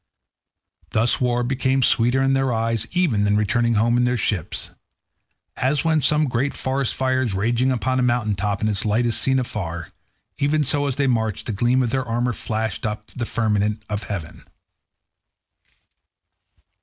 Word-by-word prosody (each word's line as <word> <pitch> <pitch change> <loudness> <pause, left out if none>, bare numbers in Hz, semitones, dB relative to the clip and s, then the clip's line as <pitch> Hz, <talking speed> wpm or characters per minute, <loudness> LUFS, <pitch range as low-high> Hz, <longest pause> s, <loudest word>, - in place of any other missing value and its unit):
Thus 115 +4 +3
war 120 -1 +1
became 130 +1 +1
sweeter 125 +3 +2
in 135 0 +2
their 135 -1 +1
eyes 115 -1 -1
even 160 - +1
than 105 0 +2
returning 115 +2 +1
home 115 +3 +3
in 120 - +3
their 125 0 +1
ships. 100 -6 -3 0.9
As 140 +4 0
when 160 -2 +3
some 150 +3 +3
great 130 +3 -1
forest 135 -1 -1
fire 130 0 +1
is 115 -7 -1
raging 120 +6 +1
upon 130 +1 0
a - - +2
mountain 120 -3 +1
top 100 +1 -2
and 110 - +1
its 100 - -1
light 110 +3 +1
is 115 - +1
seen 130 0 +2
afar, 85 -9 -4 0.5
even 150 +2 +2
so 145 +1 +1
as 135 - -1
they 140 - +1
marched 110 -5 0
the 110 - -2
gleam 120 +5 +2
of 120 - -1
their 130 0 0
armour 120 +1 -1
flashed 110 -3 -3
up 105 -1 -2
into - - -13
the 120 - -2
firmament 105 -1 0
of 105 0 -2
heaven. 95 -9 -6
120 Hz, 175 wpm, -22 LUFS, 110-130 Hz, 0.9 s, Thus